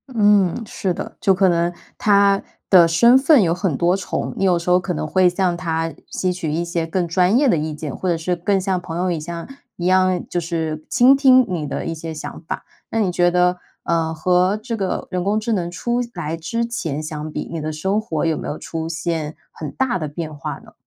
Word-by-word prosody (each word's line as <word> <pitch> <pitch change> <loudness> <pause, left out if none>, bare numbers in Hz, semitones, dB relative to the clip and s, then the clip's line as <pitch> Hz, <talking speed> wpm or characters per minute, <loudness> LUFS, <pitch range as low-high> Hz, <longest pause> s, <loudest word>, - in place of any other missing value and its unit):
嗯， 205 -2 +3
是 190 -2 -2
的， - - -7
就 195 -3 +4
可 190 0 +3
能 170 0 +1 0.3
它 200 -1 +4 0.3
的 175 -3 +7
身 235 +10 +6
份 270 -3 +5
有 165 -2 +2
很 180 -5 -1
多 175 +2 +2
重， 195 - -3
你 - - -1
有 180 -2 +4
时 170 +1 -4
候 180 0 +5
可 180 0 -3
能 155 - -3
会 185 +3 +4
向 180 -1 0
它 165 -2 -2 0.2
吸 185 -1 -1
取 165 -4 -3
一 165 +3 -1
些 170 -1 -2
更 175 +1 -1
专 180 +6 +3
业 285 0 +3
的 170 - +3
意 155 0 -2
见。 150 -2 -6
或 185 - -2
者 170 - +1
是 175 +2 -1
更 195 +3 +1
像 190 -1 -1
朋 165 -1 -6
友 180 0 0
一样 170 +1 -5 0.3
一 175 - -5
样， 185 -1 +3
就 175 - -1
是 160 -2 -3
倾 255 +3 +6
听 260 -2 +6
你 170 -5 -3
的 - - -4
一 165 - -2
些 165 0 -6
想 155 - -7
法。 - - -4 0.2
那 225 - -1
你 185 -4 +1
觉 175 0 +3
得 180 0 +2 0.3
呃， 165 -1 0
和 180 +5 +2
这 230 0 -3
个 195 -4 -3
人 180 -1 -1
工 205 +2 +1
智 225 +1 -1
能 175 -4 -1
出 240 +7 -1
来 165 -2 -3
之 230 +9 -2
前 160 - -3
相 155 0 -5
比， - - -4
你 165 -2 -4
的 155 +1 -3
生 190 +7 0
活 160 -8 -2
有 160 -1 +1
没 - - -5
有 150 - -4
出 160 0 -5
现 165 -2 -3 0.2
很 155 - -7
大 255 -7 -1
的 155 - -3
变 155 +1 -6
化 140 - -5
呢？ - - -16
175 Hz, 250 characters per minute, -20 LUFS, 165-195 Hz, 0.3 s, 的